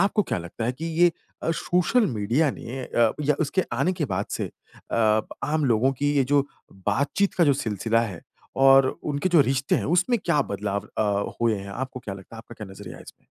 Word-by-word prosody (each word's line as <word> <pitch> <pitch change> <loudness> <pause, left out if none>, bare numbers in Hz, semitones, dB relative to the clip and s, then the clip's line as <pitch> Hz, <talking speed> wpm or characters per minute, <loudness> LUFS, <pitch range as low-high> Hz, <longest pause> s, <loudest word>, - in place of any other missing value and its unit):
आपको 205 +2 +3
क्या 175 - -2
लगता 85 +6 -6
है 120 - 0
कि 145 +6 -7 0.2
ये 175 0 +7 0.3
अ, - - 0
सोशल 180 +8 +2
मीडिया 120 - +1
ने 130 +1 -7
अ, 115 -2 +2
या 150 0 +2
उसके 165 +4 +1
आने 185 - +1
के 170 -4 -2
बाद 100 -5 -2
से - - -2
अ, - - -10 0.4
प 110 -1 +3 0.2
आम 150 +1 0
लोगों 125 +1 +3
की 145 +2 0
ये 135 - +4
जो 140 +1 +2 0.4
बातचीत 140 - +1
का 175 - +4
जो 145 - +5
सिलसिला 115 -3 0
है 100 -7 -4 0.4
और 135 0 +7 0.2
उनके 145 +5 -1
जो 175 -4 +5
रिश्ते 135 0 +1
हैं - - -2
उसमें 180 - +2
क्या 170 -4 +2
बदलाव 100 0 -3
अ, 100 -1 0
हुए 115 -2 +2
हैं? 100 0 -8
आपको 130 +4 -5
क्या 100 -4 -6
लगता 95 +4 -12
है? - - -9
आपका 115 +1 -11
क्या 110 -3 -9
नज़रिया 95 - -10
है - - -12
इसमें? - - -16
130 Hz, 220 wpm, -25 LUFS, 110-155 Hz, 0.4 s, ये